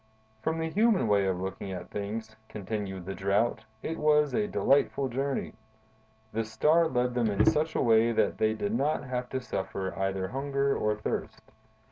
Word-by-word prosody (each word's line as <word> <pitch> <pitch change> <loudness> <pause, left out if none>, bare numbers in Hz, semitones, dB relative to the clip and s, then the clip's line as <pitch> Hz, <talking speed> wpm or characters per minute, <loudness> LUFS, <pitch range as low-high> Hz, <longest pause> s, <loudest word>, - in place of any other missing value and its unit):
"From 160 +5 -1
the 160 0 -1
human 210 - +3
way 100 -2 +3
of 90 -1 -1
looking 95 +1 -5
at 90 -2 -7
things," 110 +2 -5
continued 100 -3 -5
the 95 - -4
Drought, 100 +5 0 0.2
"it 165 - -3
was 150 -1 +3
a 210 -1 +1
delightful 140 -4 +2
journey. 135 +3 -2 0.8
The 115 +1 0
Star 150 +10 +3
led 125 -3 0
them 120 -2 +1
in 105 0 +2
such 160 0 +2
a - - +2
way 115 -1 +4
that 115 - +1
they 110 0 +2
did 105 -1 -2
not 145 +5 0
have 125 -2 -3
to 130 - -2
suffer 95 -5 -4
either 95 -1 -2
hunger 140 +1 0
or 105 0 0
thirst. 105 - -4
115 Hz, 175 wpm, -29 LUFS, 100-140 Hz, 0.8 s, way